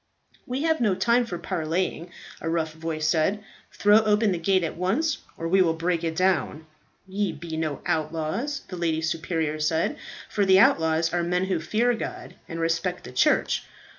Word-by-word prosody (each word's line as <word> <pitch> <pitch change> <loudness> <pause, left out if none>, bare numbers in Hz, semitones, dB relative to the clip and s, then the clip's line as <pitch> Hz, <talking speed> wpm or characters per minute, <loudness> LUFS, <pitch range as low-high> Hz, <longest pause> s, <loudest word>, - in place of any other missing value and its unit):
"We 255 +4 -2
have 320 -3 +1
no 210 -5 +3
time 235 +5 +2
for 175 - -4
parleying," 170 0 -2 0.3
a 165 - -2
rough 160 -1 -1
voice 160 -1 -3
said. 175 +6 +1 0.3
"Throw 205 +1 +5
open 215 0 +2
the 175 - -1
gate 185 +2 +2
at 165 - -3
once, 240 - 0 0.2
or 165 - -3
we 190 +3 +4
will 165 -3 +2
break 170 0 -1
it 165 -1 -2
down." 180 -3 0 0.4
"Ye 200 +1 -1
be 160 +1 -7
no 155 -3 -2
outlaws," 165 - -2
the 180 - -7
lady 165 -2 0
superior 160 -1 -1
said, 160 +2 0 0.3
"for 205 - 0
the 190 -1 +5
outlaws 160 -3 +3
are 175 - +1
men 180 +2 0
who 190 -3 0
fear 225 +9 +1
God 225 - -6 0.2
and 165 -1 -5
respect 170 +2 -1
the - - -9
church. 125 - +2
175 Hz, 180 wpm, -25 LUFS, 160-195 Hz, 0.4 s, Throw